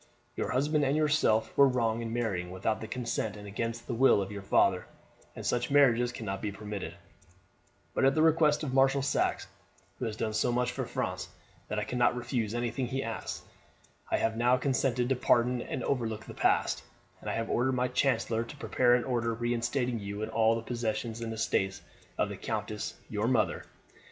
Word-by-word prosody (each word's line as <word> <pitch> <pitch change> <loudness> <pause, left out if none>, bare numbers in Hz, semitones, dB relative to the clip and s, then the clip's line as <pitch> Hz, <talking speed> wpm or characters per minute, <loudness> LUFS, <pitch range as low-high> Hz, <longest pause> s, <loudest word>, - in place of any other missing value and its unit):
Your - - -2
husband 145 +4 +1
and 140 +2 +2
yourself 150 -8 +2
were 140 - +7
wrong 115 -3 0
in 115 -1 -4
marrying 105 -7 -1
without 95 +4 -2
the 110 - -5
consent 115 -3 -3
and 105 - -10
against 115 +3 -4
the - - -3
will 130 -1 +5
of 100 0 -3
your 100 -1 -6
father, 95 - +2 0.5
and - - -7
such 120 0 0
marriages 125 -4 +4
cannot 100 -5 -5
be 105 - -2
permitted; 105 -1 -6 1.0
but - - 0
at 135 0 +4
the 155 - +4
request 155 -2 +4
of 135 -4 -3
Marshal 135 +1 +4
Saxe, 145 - 0 0.5
who 125 - -2
has 110 -2 -3
done 110 -1 -2
so 110 - +1
much 125 +1 +1
for - - -3
France - - -3 0.4
that - - -3
I - - 0
cannot 125 -1 +1
refuse 120 -3 -2
anything 120 +1 -1
he 135 +2 -2
asks, 115 -3 -5 0.7
I - - +2
have 115 0 0
now 120 +2 +3
consented 125 -2 +1
to 135 - +3
pardon 125 0 +2
and 125 - -4
overlook 115 -5 -2
the - - -9
past, - - +1 0.4
and - - -5
have 115 0 -1
ordered 130 +2 +2
my 125 0 +1
chancellor 120 -3 +1
to 115 +5 -10
prepare 125 -3 +3
an 125 - +1
order 115 -3 -1
reinstating 120 +1 -1
you 100 +1 -5
in 110 - -3
all 110 0 +3
the 115 - -4
possessions 115 -1 -3
and 115 -1 -3
estates 100 -3 -1 0.3
of - - +1
the - - -6
countess, - - -4
your 105 +2 -1
mother. 120 -4 +1
120 Hz, 190 wpm, -30 LUFS, 110-130 Hz, 1.0 s, were